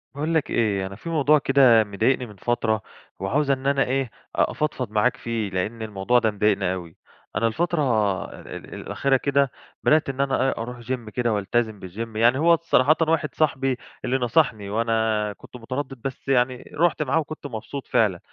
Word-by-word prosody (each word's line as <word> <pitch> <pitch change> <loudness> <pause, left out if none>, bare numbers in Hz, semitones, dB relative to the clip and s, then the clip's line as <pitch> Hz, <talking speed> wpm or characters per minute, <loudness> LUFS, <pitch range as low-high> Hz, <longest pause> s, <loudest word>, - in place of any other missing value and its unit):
باقول 155 +3 -1
لك 160 -3 +1
إيه 100 -5 +1
أنا 100 - -9
في 140 +11 -8
موضوع 150 -2 +4
كده 130 -5 +5
مضايقني 110 +5 0
من 105 -3 -12
فترة 110 +1 0 0.4
وعاوز 140 +9 +1
إن 135 0 -1
أنا 140 -1 +3
إيه 130 -2 -1 0.2
أفضفض 130 -7 -1
معاك 110 +4 +2
فيه؛ 110 -4 -3
لأن 105 +5 -2
الموضوع 110 +3 +1
ده 110 -2 +1
مضايقني 100 -3 +1
أوي. 85 -3 -8 0.4
أنا 115 - +2
الفترة 170 +7 0 0.6
ال - - -9
الأخيرة 135 -1 0
كده 140 0 +1 0.3
بدأت 155 -2 +3
إن 135 0 -2
أنا 135 -2 +1
إيه - - 0
أروح 120 +2 -5
جيم 120 -1 -4
كده 120 +1 0
وألتزم 110 +1 -1
بالجيم 110 +5 -6
يعني 120 +3 +4
هو 170 +2 +5
صراحةً 155 -2 +4
واحد 155 -3 0
صاحبي 135 -4 +1 0.3
اللي 130 - +1
نصحني 120 -5 +1
وأنا 110 -1 0
كنت - - -15
متردد 130 +2 -5
بس 135 +2 -6
يعني 125 -1 +1
رُحت 165 -1 +2
معاه 150 +3 +1
وكنت 155 -1 -6
مبسوط 130 +3 -7
فعلًا، 100 -6 +2
125 Hz, 175 wpm, -24 LUFS, 110-140 Hz, 0.6 s, كده